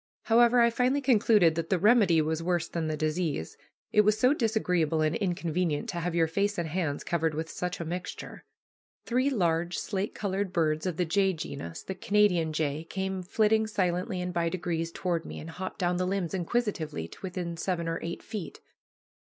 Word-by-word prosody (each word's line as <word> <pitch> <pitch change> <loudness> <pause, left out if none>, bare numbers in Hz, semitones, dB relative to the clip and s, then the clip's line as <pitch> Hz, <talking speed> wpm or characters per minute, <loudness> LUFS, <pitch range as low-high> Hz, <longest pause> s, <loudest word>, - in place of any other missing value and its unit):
However, 240 +1 +5
I 235 0 +5
finally 255 +4 +2
concluded 220 - +4
that 165 0 -3
the 190 - +3
remedy 200 -5 +5
was 160 +1 -1
worse 175 0 0
than 165 -2 -3
the 155 -1 -2
disease, 155 - -2 0.4
it 210 - +6
was 210 +1 +3
so 255 +2 +5
disagreeable 180 - +1
and 155 0 +1
inconvenient 175 -5 -1
to 175 - -3
have 170 0 -2
your 165 -1 +4
face 200 +5 0
and 170 -2 -1
hands 160 -3 -2
covered 160 -2 0
with 160 +1 -4
such 180 0 -4
a 170 - -4
mixture. 180 +2 -6 0.6
Three 255 +3 +2
large 175 -7 0
slate 200 0 -3
colored 195 -1 -2
birds 155 -1 +1
of 175 -4 -3
the 180 - +1
jay 190 +3 +2
genus, 140 - -6
the 190 - -4
Canada 195 -3 +2
jay, 155 0 -1
came 190 +2 -3
flitting 220 +4 +2
silently 180 -2 -1
and 180 0 -4
by 170 -1 +1
degrees 165 -2 -2
toward 170 -2 -2
me, - - -8
and 165 - -8
hopped 185 +3 -6
down 180 -1 0
the 180 0 0
limbs 190 -3 -1
inquisitively 175 - -2
to - - -14
within 180 -2 -4
seven 170 0 -2
or 165 0 -2
eight 170 +1 -5
feet. 210 -6 -6
180 Hz, 190 wpm, -28 LUFS, 165-200 Hz, 0.6 s, it